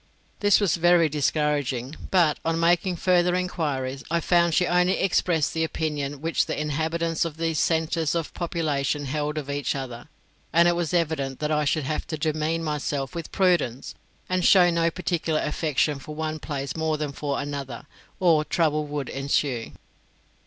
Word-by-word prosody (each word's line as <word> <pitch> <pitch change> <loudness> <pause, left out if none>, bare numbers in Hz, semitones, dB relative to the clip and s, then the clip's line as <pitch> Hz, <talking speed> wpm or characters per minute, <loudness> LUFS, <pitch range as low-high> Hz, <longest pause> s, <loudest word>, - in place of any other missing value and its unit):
This 205 -1 +4
was 190 -6 +1
very 170 -1 +4
discouraging; 145 -3 -1
but, 170 -5 +3
on 165 0 0
making 175 +2 +2
further 180 0 +2
enquiries, 145 -7 -2
I 170 +1 +1
found 170 -1 +2
she 180 - +3
only 180 +1 +2
expressed 170 -4 +1
the 160 - 0
opinion 145 -3 -3
which 165 +1 0
the - - -3
inhabitants 160 +2 -1
of 165 -2 -5
these 165 -2 -1
centres 160 0 +1
of 165 -2 -3
population 150 -4 -1
held 150 +2 -2
of 145 -3 -4
each 140 0 -2
other; 130 0 -6 0.4
and 170 +1 +5
it 175 - +3
was 170 -2 -1
evident 155 -6 0
that 150 0 -2
I 150 -1 +1
should 150 +2 +1
have 150 +3 -3
to 155 - -4
demean 155 +1 -1
myself 145 -2 -2
with 170 -2 -6
prudence, 170 -10 +1 0.3
and 185 0 0
show 180 -2 +6
no 170 0 +2
particular 165 -2 -1
affection 150 -2 0
for 150 +2 -9
one 155 0 -3
place 140 -3 -4
more 160 -1 0
than 150 -1 -3
for 140 0 -3
another, 140 -3 -5 0.3
or 165 -4 +4
trouble 155 -2 0
would 145 -2 -4
ensue. 135 -3 -1
155 Hz, 165 wpm, -25 LUFS, 145-170 Hz, 0.4 s, show